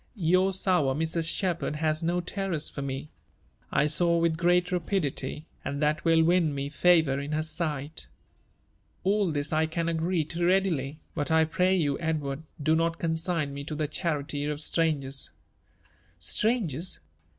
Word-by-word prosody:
Your 185 Hz, 0 st, +3 dB
sour 180 Hz, -8 st, +2 dB
Mrs. 160 Hz, +1 st, 0 dB
Shepherd 175 Hz, -5 st, -1 dB
has 155 Hz, 0 st, 0 dB
no 175 Hz, +2 st, 0 dB
terrors 185 Hz, -3 st, -2 dB
for 140 Hz, -, -6 dB
me. 140 Hz, +2 st, -5 dB, 0.6 s
I 140 Hz, -, +3 dB
sew 170 Hz, +3 st, +3 dB
with 165 Hz, -1 st, +2 dB
great 175 Hz, +2 st, +2 dB
rapidity; 165 Hz, -4 st, -2 dB, 0.2 s
and 140 Hz, 0 st, -3 dB
that 150 Hz, +1 st, +1 dB
will 165 Hz, -1 st, +4 dB
win 165 Hz, -3 st, +3 dB
me 140 Hz, 0 st, -3 dB
fa 170 Hz, +3 st, +5 dB
Toiir 140 Hz, -1 st, -2 dB
in 145 Hz, +2 st, -4 dB
her 155 Hz, +1 st, 0 dB
sight. 155 Hz, -2 st, -3 dB, 1.0 s
All 200 Hz, -2 st, +2 dB
this 145 Hz, +1 st, -2 dB
I 160 Hz, +1 st, +2 dB
can 165 Hz, +1 st, -2 dB
agree 165 Hz, +1 st, 0 dB
to 170 Hz, +3 st, -4 dB
readily: 170 Hz, -6 st, +1 dB, 0.2 s
but 145 Hz, -1 st, -2 dB
I 160 Hz, 0 st, +4 dB
pray 185 Hz, +3 st, +2 dB
you, 145 Hz, -6 st, 0 dB
Edward, 150 Hz, -3 st, -2 dB, 0.2 s
do 155 Hz, +2 st, +2 dB
not 165 Hz, 0 st, +1 dB
consign 160 Hz, -3 st, -1 dB
me 140 Hz, 0 st, -5 dB
to 155 Hz, -, -4 dB
the 150 Hz, 0 st, -1 dB
charity 145 Hz, -2 st, -2 dB
of 150 Hz, 0 st, -2 dB
strangers.' 145 Hz, -4 st, 0 dB, 0.6 s
• -, -, -29 dB
'^ -, -, -36 dB, 0.3 s
Strangers 185 Hz, -, -1 dB
160 Hz, 165 wpm, -28 LUFS, 150-175 Hz, 1.0 s, fa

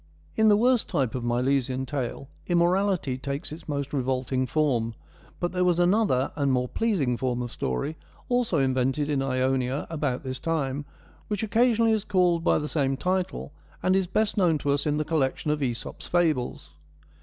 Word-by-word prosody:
In 220 Hz, -, +4 dB
the 205 Hz, -, +6 dB
worse 245 Hz, +1 st, +3 dB
type 135 Hz, -, -1 dB
of 125 Hz, -, -3 dB
Milesian 130 Hz, +2 st, 0 dB
Tale 135 Hz, -1 st, -4 dB, 0.2 s
immorality 175 Hz, -5 st, +1 dB
takes 140 Hz, +2 st, -4 dB
its 155 Hz, 0 st, -9 dB
most 140 Hz, -1 st, -3 dB
revolting 130 Hz, -1 st, 0 dB
form; 120 Hz, -6 st, 0 dB, 0.4 s
but 175 Hz, -, -1 dB
there 180 Hz, 0 st, 0 dB
was 180 Hz, -2 st, +3 dB
another 175 Hz, -, +2 dB
and 140 Hz, -3 st, +1 dB
more 125 Hz, -1 st, +1 dB
pleasing 170 Hz, -, 0 dB
form 125 Hz, -1 st, -1 dB
of 120 Hz, -, -6 dB
story, 65 Hz, -, -3 dB, 0.3 s
also 245 Hz, -8 st, +1 dB
invented 135 Hz, +2 st, +1 dB
in 140 Hz, -2 st, +1 dB
Ionia 130 Hz, 0 st, 0 dB
about 145 Hz, -6 st, -2 dB
this 130 Hz, -1 st, -4 dB
time, 145 Hz, -3 st, -2 dB, 0.4 s
which 210 Hz, +1 st, -2 dB
occasionally 230 Hz, +1 st, +3 dB
is 215 Hz, -2 st, +1 dB
called 180 Hz, -4 st, +2 dB
by -, -, +3 dB
the 150 Hz, -, -2 dB
same 135 Hz, -3 st, 0 dB
title, 185 Hz, -2 st, -2 dB, 0.3 s
and 185 Hz, +1 st, +3 dB
is 190 Hz, -1 st, +1 dB
best 215 Hz, +4 st, 0 dB
known 175 Hz, -5 st, +3 dB
to 145 Hz, -1 st, -1 dB
us 140 Hz, +1 st, 0 dB
in 150 Hz, 0 st, +1 dB
the 155 Hz, -, -1 dB
collection 150 Hz, -1 st, 0 dB
of 150 Hz, -, 0 dB
iEsop's 120 Hz, -5 st, -4 dB
Fables. 160 Hz, -8 st, 0 dB
145 Hz, 175 wpm, -26 LUFS, 130-180 Hz, 0.4 s, the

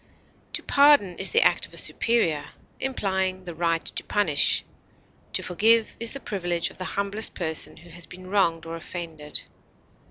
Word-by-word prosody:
To -, -, -2 dB
pardon 280 Hz, -11 st, +5 dB
is 190 Hz, -, +3 dB
the 470 Hz, -, +4 dB
act -, -, +2 dB
of -, -, -15 dB
a -, -, -9 dB
superior, 175 Hz, -11 st, +1 dB, 0.3 s
implying 190 Hz, -7 st, -1 dB
the 175 Hz, -2 st, -7 dB
right 165 Hz, 0 st, 0 dB
to -, -, -4 dB
punish; 170 Hz, -9 st, +2 dB, 0.7 s
to -, -, 0 dB
forgive 220 Hz, +5 st, +3 dB
is 230 Hz, 0 st, -3 dB
the 275 Hz, -, -5 dB
privilege 175 Hz, -7 st, -2 dB
of -, -, -14 dB
the 185 Hz, -, -4 dB
humblest 200 Hz, +2 st, +1 dB
person 160 Hz, -3 st, -2 dB
who 170 Hz, +1 st, -15 dB
has 170 Hz, -1 st, -7 dB
been 185 Hz, 0 st, -11 dB
wronged 185 Hz, -4 st, +1 dB
or 165 Hz, 0 st, -5 dB
offended. 165 Hz, -3 st, -6 dB
185 Hz, 165 wpm, -25 LUFS, 165-210 Hz, 0.7 s, pardon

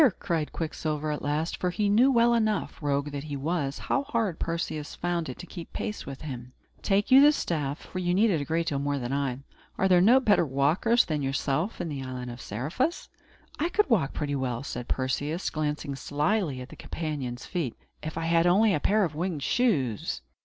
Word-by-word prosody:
cried 165 Hz, -5 st, -1 dB
Quicksilver, 155 Hz, -2 st, -2 dB
at 150 Hz, -, -3 dB
last 150 Hz, +3 st, -1 dB
for 180 Hz, -, 0 dB
he 205 Hz, +4 st, 0 dB
knew 235 Hz, +7 st, +5 dB
well 235 Hz, -1 st, +4 dB
enough, 215 Hz, -6 st, 0 dB
rogue 145 Hz, 0 st, 0 dB
that 140 Hz, +1 st, -5 dB
he 145 Hz, -2 st, -4 dB
was, 145 Hz, -1 st, -1 dB
how 275 Hz, -, 0 dB
hard 230 Hz, -, -1 dB
Perseus 165 Hz, -3 st, -3 dB
found 170 Hz, -3 st, -2 dB
it 125 Hz, -, -6 dB
to -, -, -8 dB
keep 170 Hz, -1 st, -9 dB
pace 210 Hz, -1 st, -4 dB
with 135 Hz, -1 st, -7 dB
him 125 Hz, -4 st, -7 dB, 0.3 s
"take 205 Hz, +4 st, +1 dB
you 265 Hz, +1 st, +9 dB
the 295 Hz, +1 st, +8 dB
staff, 150 Hz, -, -2 dB
for 185 Hz, -, -7 dB
you 175 Hz, -1 st, 0 dB
need 205 Hz, +4 st, +4 dB
it 160 Hz, -5 st, +1 dB
a -, -, -1 dB
great 165 Hz, +4 st, 0 dB
deal 140 Hz, -4 st, -1 dB
more 145 Hz, 0 st, -1 dB
than 125 Hz, 0 st, -3 dB
I. 135 Hz, -2 st, -1 dB, 0.4 s
Are 190 Hz, -, +3 dB
there 180 Hz, -2 st, +5 dB
no 235 Hz, +8 st, +7 dB
better 215 Hz, -8 st, +4 dB
walkers 160 Hz, -, +3 dB
than 155 Hz, -2 st, -1 dB
yourself 140 Hz, +7 st, -1 dB
in 175 Hz, -, -2 dB
the 145 Hz, -4 st, -4 dB
island 125 Hz, -1 st, -5 dB
of 120 Hz, +1 st, -9 dB
Seriphus?" 165 Hz, -, -2 dB, 0.5 s
"I 330 Hz, +4 st, +1 dB
could 415 Hz, -6 st, +1 dB
walk 165 Hz, -11 st, +3 dB
pretty 145 Hz, -1 st, -2 dB
well," 125 Hz, -2 st, -2 dB
said 125 Hz, -3 st, -5 dB
Perseus, 145 Hz, +6 st, -1 dB
glancing 150 Hz, -1 st, -2 dB
slyly 145 Hz, -, 0 dB
at 125 Hz, -, -9 dB
his -, -, -12 dB
companion's 140 Hz, -6 st, -4 dB
feet, 165 Hz, -10 st, -3 dB, 0.3 s
"if 155 Hz, +1 st, -5 dB
I 165 Hz, -, -2 dB
had 165 Hz, +1 st, +3 dB
only 200 Hz, +4 st, +5 dB
a 150 Hz, -, +1 dB
pair 210 Hz, +7 st, +3 dB
of 160 Hz, -, -4 dB
winged 160 Hz, -2 st, -2 dB
shoes." 145 Hz, -, 0 dB
155 Hz, 210 wpm, -27 LUFS, 140-195 Hz, 0.5 s, you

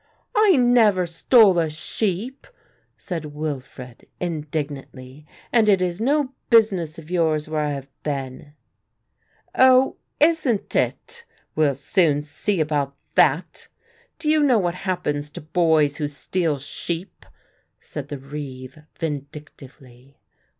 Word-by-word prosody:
"I 420 Hz, -4 st, +5 dB
never 235 Hz, -7 st, +4 dB
stole 185 Hz, +3 st, +4 dB
a 160 Hz, -2 st, +1 dB
sheep," 200 Hz, -, -4 dB, 0.5 s
said 160 Hz, -5 st, -6 dB
Wilfred 130 Hz, -5 st, -7 dB
indignantly, 150 Hz, -4 st, -5 dB, 0.3 s
"and 225 Hz, -3 st, +4 dB
it 195 Hz, -2 st, +5 dB
is 180 Hz, +2 st, -2 dB
no 275 Hz, +2 st, +1 dB, 0.2 s
business 195 Hz, -9 st, +3 dB
of 165 Hz, +1 st, -11 dB
yours 160 Hz, -4 st, +1 dB
where 155 Hz, -1 st, -1 dB
I 150 Hz, -, -1 dB
have 140 Hz, -1 st, -6 dB
been." 140 Hz, 0 st, -5 dB, 1.0 s
"Oh, 260 Hz, 0 st, +5 dB, 0.2 s
isn't 300 Hz, -9 st, +2 dB
it; 475 Hz, 0 st, -1 dB, 0.3 s
we'll 150 Hz, -3 st, +2 dB
soon 145 Hz, +1 st, +1 dB
see 180 Hz, +6 st, -2 dB
about 145 Hz, -3 st, -1 dB, 0.2 s
that. -, -, +2 dB, 0.5 s
Do 320 Hz, -, -6 dB
you 305 Hz, 0 st, +4 dB
know 265 Hz, -5 st, +4 dB
what 175 Hz, -4 st, 0 dB
happens 160 Hz, -6 st, -3 dB
to -, -, -9 dB
boys 155 Hz, -2 st, +2 dB
who 150 Hz, -, -1 dB
steal 155 Hz, +2 st, -2 dB
sheep?" 165 Hz, +6 st, -6 dB, 0.6 s
said 145 Hz, -2 st, -7 dB
the 145 Hz, -, -6 dB
reeve 135 Hz, -1 st, -8 dB, 0.2 s
vindictively. 140 Hz, -4 st, -8 dB
160 Hz, 120 wpm, -22 LUFS, 145-205 Hz, 1.0 s, I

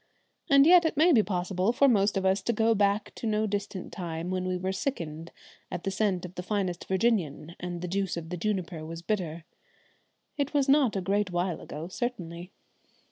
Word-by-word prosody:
And 275 Hz, 0 st, +7 dB
yet 350 Hz, +1 st, +7 dB
it 320 Hz, -3 st, -1 dB
may 330 Hz, +4 st, +6 dB
be 240 Hz, -8 st, +6 dB
possible 185 Hz, +1 st, 0 dB
for 275 Hz, +3 st, +4 dB
most 205 Hz, -5 st, +3 dB
of 190 Hz, -, -1 dB
us 190 Hz, +1 st, +3 dB
to 235 Hz, -, 0 dB
go 225 Hz, +1 st, +3 dB
back 200 Hz, 0 st, +1 dB
to 230 Hz, -, -5 dB
no 215 Hz, 0 st, +1 dB
distant 205 Hz, -2 st, -4 dB
time 170 Hz, -1 st, -4 dB
when 185 Hz, 0 st, -1 dB
we 185 Hz, +1 st, -1 dB
sickened 165 Hz, -, -4 dB, 0.4 s
at 175 Hz, -, -5 dB
the 195 Hz, -, -1 dB
scent 190 Hz, -2 st, 0 dB
of 180 Hz, -, -9 dB
the 180 Hz, -, -5 dB
finest 185 Hz, -2 st, -2 dB
Virginian 185 Hz, -6 st, 0 dB
and 175 Hz, -1 st, -5 dB
the -, -, -2 dB
juice 190 Hz, 0 st, -1 dB
of 165 Hz, -1 st, -6 dB
the 180 Hz, -, -3 dB
juniper 180 Hz, -4 st, -2 dB
was 165 Hz, +1 st, -7 dB
bitter. 170 Hz, -6 st, -2 dB, 0.9 s
It 285 Hz, +1 st, -1 dB
was 280 Hz, -1 st, +3 dB
not 275 Hz, -5 st, +4 dB
a 195 Hz, -, 0 dB
great 200 Hz, +1 st, 0 dB
while 175 Hz, -1 st, -1 dB
ago 155 Hz, +3 st, -7 dB
certainly! 180 Hz, -5 st, -5 dB
190 Hz, 195 wpm, -28 LUFS, 175-220 Hz, 0.9 s, And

